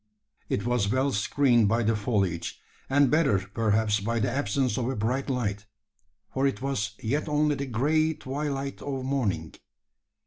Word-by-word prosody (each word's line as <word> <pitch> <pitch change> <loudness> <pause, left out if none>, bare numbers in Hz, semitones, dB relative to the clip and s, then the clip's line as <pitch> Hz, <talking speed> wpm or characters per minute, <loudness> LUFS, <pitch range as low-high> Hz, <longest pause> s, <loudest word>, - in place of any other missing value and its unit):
It 100 - -1
was 120 -4 +1
well 130 +3 +2
screened 120 +2 +3
by 115 +3 +2
the 110 +1 +2
foliage, 100 -6 -1 0.3
and 140 -1 +4
better 150 -9 +4
perhaps 105 +2 +1
by 115 +4 -1
the 105 - 0
absence 130 -1 0
of 125 -1 -1
a 135 - -2
bright 125 +6 -1
light: 105 -5 -2 0.7
for 135 +1 +2
it 135 - -2
was 110 -6 -2
yet 145 +8 -1
only 150 0 +2
the 140 -1 -3
grey 155 +6 +1
twilight 140 0 -4
of 135 -2 -4
morning. 100 - -1
125 Hz, 160 wpm, -27 LUFS, 105-140 Hz, 0.7 s, and